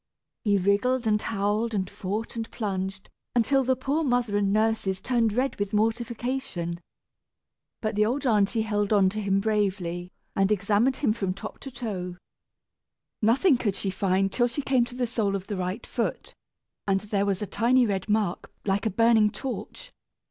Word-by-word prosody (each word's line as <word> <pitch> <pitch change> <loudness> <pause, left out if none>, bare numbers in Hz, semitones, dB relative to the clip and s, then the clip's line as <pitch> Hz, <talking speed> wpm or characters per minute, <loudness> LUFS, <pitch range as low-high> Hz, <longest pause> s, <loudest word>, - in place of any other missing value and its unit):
He 205 -3 +3
wriggled, 205 +7 +2
and 210 -1 +2
howled, 215 +2 0
and 190 -2 0
fought, 205 +4 -4
and 225 -1 -4
plunged, 190 -3 -3 0.3
until 270 +3 +3
the 260 +1 +2
poor 275 +5 -1
mother 245 -6 +1
and 200 -1 +2
nurses 215 -3 +1
turned 230 +1 +1
red 255 +5 0
with 205 +1 -1
mortification. 225 -5 -1 1.0
But 215 -1 -1
the 210 0 +3
old 275 +5 -1
aunty 220 -1 +3
held 205 -1 -1
on 200 -3 +5
to 215 +3 -4
him 195 -1 +2
bravely, 190 -4 -1 0.2
and 195 +1 +2
examined 210 +6 +2
him 240 -7 +2
from 195 -5 -2
top 215 +2 -8
to 270 - -7
toe. 195 -8 -5 1.0
Nothing 255 - +4
could 205 -6 0
she 195 0 -2
find, 195 0 +1
till 240 +4 +2
she 260 +4 -4
came 255 -3 +3
to 245 +1 -10
the 250 -1 0
sole 220 -4 0
of 190 -1 -4
the 205 - -4
right 185 +5 -3
foot, - - -3 0.5
and 195 -1 +2
there 205 -1 -1
was 195 0 0
a - - -1
tiny 245 +4 +3
red 195 -1 -2
mark 210 -4 0
like 200 +1 +1
a - - +2
burning 225 +1 +4
torch. 270 - -6
210 Hz, 175 wpm, -26 LUFS, 195-235 Hz, 1.0 s, on